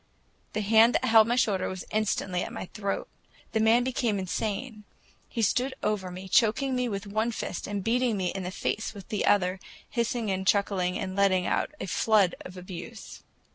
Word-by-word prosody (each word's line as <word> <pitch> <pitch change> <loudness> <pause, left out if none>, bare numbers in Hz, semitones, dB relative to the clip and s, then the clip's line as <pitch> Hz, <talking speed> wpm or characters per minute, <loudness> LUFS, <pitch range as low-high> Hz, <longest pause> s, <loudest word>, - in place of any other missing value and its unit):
The 215 - -1
hand 220 +3 +5
that 255 - +1
held 225 -2 +6
my 240 - +2
shoulder 200 -6 +1
was 185 -1 -6
instantly 200 -4 0
at - - -4
my - - -5
throat. 200 -2 -3 0.4
The 220 - +1
man 225 +2 +4
became 240 -4 0
insane; 210 +4 -3 0.5
he 230 - -2
stood 255 +5 +1
over 210 -3 -1
me, 185 +1 -8
choking 255 +7 +3
me 250 -1 0
with 200 -1 -4
one 215 +3 0
fist 200 - -4
and 205 -1 -3
beating 235 0 +1
me 185 -2 -1
in 195 - -4
the 180 - -4
face 215 +3 -3
with 195 -2 -11
the 210 - -1
other, 185 -2 +3 0.3
hissing 235 -2 -1
and 190 0 -2
chuckling 195 -3 +2
and 185 -1 -4
letting 190 -2 +3
out - - 0
a - - -3
flood 200 0 +3
of 180 0 -10
abuse. 185 +5 -9
210 Hz, 190 wpm, -28 LUFS, 190-230 Hz, 0.5 s, held